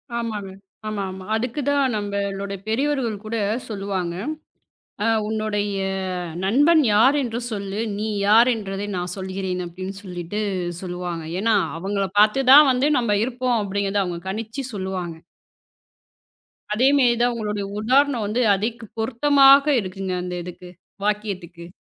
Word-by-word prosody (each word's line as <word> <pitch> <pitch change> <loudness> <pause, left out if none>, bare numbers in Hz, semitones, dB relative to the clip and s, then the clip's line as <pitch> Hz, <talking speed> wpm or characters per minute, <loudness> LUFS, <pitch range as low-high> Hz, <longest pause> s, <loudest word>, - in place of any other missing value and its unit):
ஆமாங்க. 220 -4 -3 0.4
ஆமா, 210 -2 -2
ஆமா. 185 0 -9
அதுக்கு 245 +5 -2
தான் 280 -3 +2
நம்ம 200 -1 -2 0.2
ளோட 200 0 -4
பெரியவர்கள் 255 -1 0
கூடச் 220 +1 -2
சொல்லுவாங்க. 195 -4 -3 0.9
அ - - +2 0.2
"உன்னுடைய 210 -2 -1 0.7
நண்பன் 290 - +4
யார் 245 +7 +5
என்று 235 -1 -3
சொல்லு. 200 -1 -4 0.2
நீ 215 +1 -2 0.2
யார் 230 +4 +6
என்பதை 200 -2 -4
நான் 180 0 -3
சொல்லுகிறேன்." 190 -1 -3
அப்படின்னு 185 +3 -7
சொல்லிட்டு 180 +2 -5 0.4
சொல்லுவாங்க. 175 -2 -5 0.2
ஏன்னா 225 0 +3 0.2
அவங்கள 195 +2 -1
பாத்துதான் 270 +7 +7
வந்து 255 +3 +2
நாம 225 -4 +1
இருப்போம் 250 -1 0
அப்படின்னு 200 0 -1
அவங்க 175 -1 -4
கணிச்சு 225 +6 -4
சொல்லுவாங்க. 190 -4 -4 1.6
அதே 245 +5 +3
மாதிரிதான், 240 -2 +3
உங்களோட 210 -2 -3 0.2
உதாரணம் 255 +1 +2
வந்து, 225 +4 0
அதிக் 225 +4 -3 0.2
பொருத்தமாக 275 +4 +5
இருக்குங்க, 190 -1 -4
அந்த 180 0 -5
இதுக்கு 180 0 -10 0.4
வாக்கியத்துக்கு! 190 -5 -3
210 Hz, 125 wpm, -22 LUFS, 195-240 Hz, 1.6 s, பாத்துதான்